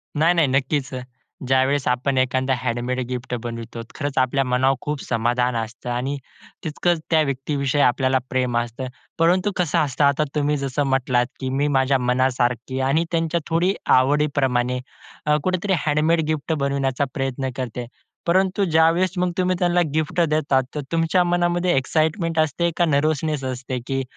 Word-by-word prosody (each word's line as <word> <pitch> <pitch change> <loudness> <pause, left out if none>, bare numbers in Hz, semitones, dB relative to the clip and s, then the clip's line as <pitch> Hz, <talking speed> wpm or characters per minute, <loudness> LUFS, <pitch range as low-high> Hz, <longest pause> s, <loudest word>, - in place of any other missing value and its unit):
नाही, 160 +4 +4
नाही 165 -4 +3
नक्कीच. 135 +1 0 0.6
ज्यावेळेस 130 +1 +2
आपण 130 +2 0
एखादा 130 +1 +1
हँडमेड 125 +1 -2
गिफ्ट 125 0 -5
बनवितो 115 0 -6
खरंच 145 -3 -4
आपल्या 130 +1 +2
मनावर 130 +1 +2
खूप 150 -1 -3
समाधान 120 +1 0
असतं. 115 +2 -5
आणि 130 +4 -2 0.5
तितकंच 165 +2 0
त्या 160 -2 +4
व्यक्तीविषयी 140 +1 -1
आपल्याला 130 +1 +3
प्रेम 125 -2 0
असतं. 120 +2 -3 0.3
परंतु 180 +5 +3
कसं 175 -5 +1
असतं? 145 -1 0
आता 140 +2 +3
तुम्ही 150 0 +1
जसं 140 +1 -1
म्हटलात 130 -2 +1
की 130 -1 -3
"मी 140 +3 0
माझ्या 135 +1 +3
मनासारखी 125 0 0
आणि 135 +5 +2
त्यांच्या 165 0 0
थोडी 175 +4 +2 0.2
आवडीप्रमाणे" 130 -2 +1 0.5
अ, 150 0 +3
कुठेतरी 185 +1 0
हँडमेड 155 +2 +2
गिफ्ट 155 0 -1
बनवण्याचा 140 -2 0
प्रयत्न 135 0 -2
करते. 125 -2 -4 0.4
परंतु 190 +3 +2
ज्यावेळेस 165 +2 +3
मग 180 0 +1
तुम्ही 185 0 +1
त्यांना 175 0 +2
गिफ्ट 155 +2 -1
देतात, 140 -4 +2
तर 150 - -2
तुमच्या 165 +2 +2
मनामध्ये 175 0 +1
एक्साईटमेंट 160 +4 0
असते 155 +3 +1
का 175 - +4
नर्व्हसनेस 155 -1 0
असते? 130 0 -4
की 135 -1 -1
140 Hz, 150 wpm, -22 LUFS, 130-160 Hz, 0.6 s, नाही